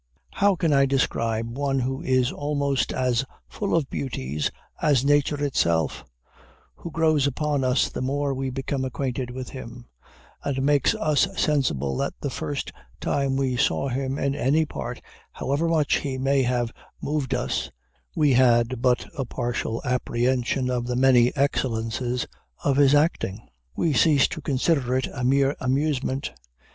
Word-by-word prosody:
How 200 Hz, -1 st, +3 dB
can 165 Hz, -3 st, +1 dB
I 140 Hz, 0 st, +4 dB
describe 115 Hz, -3 st, 0 dB
one 140 Hz, -1 st, 0 dB
who 130 Hz, +2 st, -2 dB
is 130 Hz, -1 st, +2 dB
almost 140 Hz, -2 st, -1 dB
as 125 Hz, -1 st, +1 dB, 0.2 s
full 200 Hz, -4 st, -2 dB
of 160 Hz, -5 st, +1 dB
beauties 75 Hz, -, -2 dB, 0.3 s
as 140 Hz, -4 st, +3 dB
nature 145 Hz, 0 st, +2 dB
itself, 85 Hz, -, 0 dB, 0.7 s
who 170 Hz, -, -7 dB
grows 155 Hz, -3 st, +2 dB
upon 145 Hz, 0 st, -1 dB
us 125 Hz, +1 st, +2 dB
the -, -, -6 dB
more 140 Hz, +2 st, 0 dB
we 135 Hz, 0 st, -2 dB
become 135 Hz, +1 st, -3 dB
acquainted 130 Hz, -1 st, -3 dB
with 125 Hz, 0 st, -6 dB
him, 120 Hz, -2 st, -9 dB, 0.6 s
and 135 Hz, -2 st, -1 dB
makes 145 Hz, 0 st, +3 dB
us 155 Hz, -2 st, +2 dB
sensible 100 Hz, -, +1 dB
that -, -, -2 dB
the -, -, -3 dB
first -, -, -4 dB, 0.3 s
time 140 Hz, -1 st, 0 dB
we 135 Hz, -2 st, 0 dB
saw 135 Hz, +1 st, +1 dB
him 135 Hz, +2 st, -2 dB
in 140 Hz, -1 st, 0 dB
any 145 Hz, +5 st, +2 dB
part, -, -, -6 dB, 0.3 s
however 145 Hz, +5 st, -1 dB
much 155 Hz, -3 st, +2 dB
he 135 Hz, -2 st, -3 dB
may 135 Hz, +1 st, +2 dB
have 120 Hz, -2 st, 0 dB, 0.3 s
moved 140 Hz, -3 st, -1 dB
us, -, -, -2 dB, 0.5 s
we 145 Hz, -3 st, +3 dB
had 120 Hz, -1 st, +3 dB
but 125 Hz, -1 st, +2 dB
a 135 Hz, -, -2 dB
partial 120 Hz, -2 st, -3 dB
apprehension 125 Hz, +1 st, 0 dB
of 120 Hz, -1 st, -1 dB
the 125 Hz, -, -1 dB
many 125 Hz, -1 st, +5 dB
excellences 125 Hz, -3 st, -1 dB, 0.4 s
of 140 Hz, -1 st, +2 dB
his 145 Hz, 0 st, +6 dB
acting? 145 Hz, -, 0 dB, 0.3 s
We 160 Hz, -, +1 dB
cease 145 Hz, 0 st, +4 dB
to 155 Hz, -, -6 dB
consider 135 Hz, -2 st, +1 dB
it 130 Hz, -, 0 dB
as -, -, -8 dB
a -, -, -2 dB
mere 135 Hz, +2 st, +3 dB
amusement. 135 Hz, 0 st, -1 dB
135 Hz, 155 wpm, -25 LUFS, 125-145 Hz, 0.7 s, his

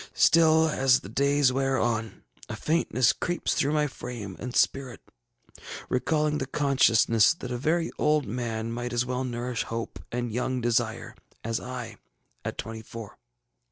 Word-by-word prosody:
Still, 160 Hz, -1 st, +5 dB
as 135 Hz, -4 st, +3 dB
the 100 Hz, -, -10 dB
days 140 Hz, +2 st, +2 dB
wear 135 Hz, 0 st, +1 dB
on, 110 Hz, -3 st, -2 dB, 0.3 s
a -, -, -4 dB
faintness 150 Hz, -6 st, +2 dB
creeps 175 Hz, 0 st, -1 dB
through 145 Hz, +2 st, +1 dB
my 150 Hz, -1 st, +2 dB
frame 120 Hz, -8 st, -7 dB
and 125 Hz, 0 st, -6 dB
spirit, 130 Hz, -5 st, +1 dB, 0.9 s
recalling 150 Hz, +3 st, +1 dB
the 130 Hz, -, -3 dB
consciousness 130 Hz, -3 st, +3 dB
that 125 Hz, -7 st, -7 dB
a 125 Hz, -, -2 dB
very 165 Hz, +4 st, 0 dB
old 150 Hz, -2 st, +2 dB
man 115 Hz, 0 st, -3 dB
might 120 Hz, +1 st, -4 dB
as 120 Hz, 0 st, +1 dB
well 125 Hz, +1 st, -2 dB
nourish 120 Hz, -1 st, -3 dB
hope 115 Hz, 0 st, -5 dB
and 120 Hz, -1 st, -2 dB
young 125 Hz, +2 st, -1 dB
desire 120 Hz, -1 st, -1 dB, 0.3 s
as 115 Hz, 0 st, -1 dB
I 125 Hz, -2 st, -7 dB, 0.5 s
at -, -, -4 dB
twenty 110 Hz, 0 st, -6 dB
four. 110 Hz, -1 st, -10 dB
125 Hz, 155 wpm, -27 LUFS, 115-140 Hz, 0.9 s, Still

